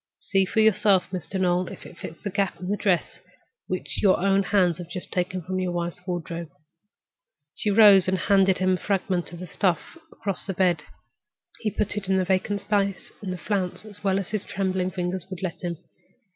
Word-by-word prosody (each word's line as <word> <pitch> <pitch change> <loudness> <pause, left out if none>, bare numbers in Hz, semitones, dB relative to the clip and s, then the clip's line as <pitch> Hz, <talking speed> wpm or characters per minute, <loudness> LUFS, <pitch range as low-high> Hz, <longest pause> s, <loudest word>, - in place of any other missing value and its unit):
See 195 -1 +1
for 220 +4 +1
yourself, 205 -4 +4
Mr. 185 +1 -4
Noel, 180 -1 +2
if - - -9
it - - -11
fits 160 - -9
the 200 - -3
gap 195 -2 -1
in 180 +1 -5
that 205 - 0
dress 185 -4 0 0.5
which - - -3
your 195 -3 +4
own 195 +1 +3
hands 185 -4 +2
have 175 -1 -7
just 180 0 -5
taken 185 0 -1
from 185 +2 -2
your 185 -1 -1
wife's 175 0 -3
wardrobe." 170 -2 -4 1.0
She 215 - -2
rose 200 -3 +7
and 190 0 +2
handed 195 0 +3
him 185 0 +2
the 180 - -2
fragment 190 -3 -1
of 175 +1 -7
stuff 185 - -1
across 195 -4 -4
the 195 - -2
bed. 175 -4 +2 0.8
He 220 - 0
put 210 0 -2
it 200 -2 -3
into 190 - +3
the 185 - +1
vacant 190 +2 0
space 200 -2 -1
in 200 - -5
the 185 - -3
flounce 190 +1 -2
as 205 -1 -6
well 195 -1 +2
as 195 -2 -3
his 215 -2 -2
trembling 185 -1 -1
fingers 180 0 -3
would 185 -1 -7
let 180 -3 -4
him. 175 -2 -3
185 Hz, 200 wpm, -25 LUFS, 180-200 Hz, 1.0 s, rose